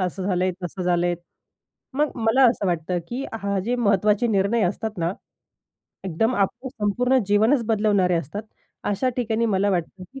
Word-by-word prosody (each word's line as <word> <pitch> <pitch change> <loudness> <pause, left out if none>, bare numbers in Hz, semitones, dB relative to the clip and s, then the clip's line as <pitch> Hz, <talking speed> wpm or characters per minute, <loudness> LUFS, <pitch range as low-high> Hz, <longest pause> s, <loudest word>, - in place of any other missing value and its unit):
असं 185 +1 -4
झालंय. 185 -1 +1
तसं 180 +1 -5
झालंय." 175 0 +1 0.8
मग 300 +1 +1
मला 235 +2 +3
असं 205 -4 -3
वाटतं 175 +1 -1
की 260 +3 -4
हा 200 -2 -2
जे 245 +1 +1
महत्त्वाचे 210 0 +2
निर्णय 205 +2 +2
असतात 210 +2 -3
ना 170 +2 0 0.9
एकदम 225 +8 0
आपलं 205 +6 -1
संपूर्ण 250 +3 +1
जीवनच 225 +5 +3
बदलवणारे 205 -5 +2
असतात, 165 +7 -4 0.4
अशा 205 +6 0
ठिकाणी 230 -1 0
मला 200 +2 +2
वाटतं 185 +1 -2
की 270 - -8
205 Hz, 155 wpm, -23 LUFS, 185-235 Hz, 0.9 s, मला